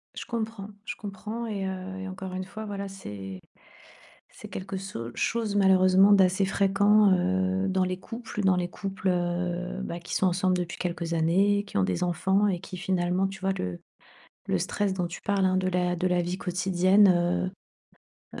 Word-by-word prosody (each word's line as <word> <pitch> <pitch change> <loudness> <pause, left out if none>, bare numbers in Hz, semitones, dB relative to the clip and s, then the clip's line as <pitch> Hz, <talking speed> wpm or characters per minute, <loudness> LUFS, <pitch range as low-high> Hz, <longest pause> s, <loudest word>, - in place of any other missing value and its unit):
Je - - -6
comprends 225 -3 -4 0.2
je - - -4
comprends 215 +3 -6
et, 205 -4 -3
heu, 190 0 -5
et 190 - -5
encore 190 0 -7
une 185 0 -3
fois 220 +3 -7
voilà 200 -1 -4
c'est 100 - -8 0.9
c'est - - -11
quelque 195 +1 -5
so 185 -12 -6
chose 225 -3 -1
malheureusement 190 0 +6
d'assez 190 0 +4
fréquent, 200 +1 +4
heu, 190 +1 +1
dans 190 0 +1
les 185 0 -2
couples 230 0 -6
dans 190 -1 +4
les 175 -1 -1
couples, 195 +1 -3
heu, 180 +1 -1
bah, 170 -2 -5
qui 170 - -6
sont 190 - +3
ensemble 185 0 +1
depuis 175 0 -4
quelques 170 -2 -3
années, 190 +5 +3
qui 200 - -5
ont 95 - +3
des 95 - 0
enfants 190 +4 +2
et 185 -3 0
qui 190 +1 -8
finalement 180 +1 0
tu 195 0 -9
vois? 190 0 +1
Le 90 - -4 0.7
le 95 - +1
stress 200 - -1
dont 180 -2 -1
tu 170 - -7
parles 200 -2 +1
hein, 185 0 +2
de 185 0 0
la 180 -1 +1
de 180 +1 0
la 180 -1 +2
vie 175 +2 -3
quotidienne, 185 0 +3 0.9
heu, - - -6
185 Hz, 185 wpm, -27 LUFS, 180-195 Hz, 0.9 s, malheureusement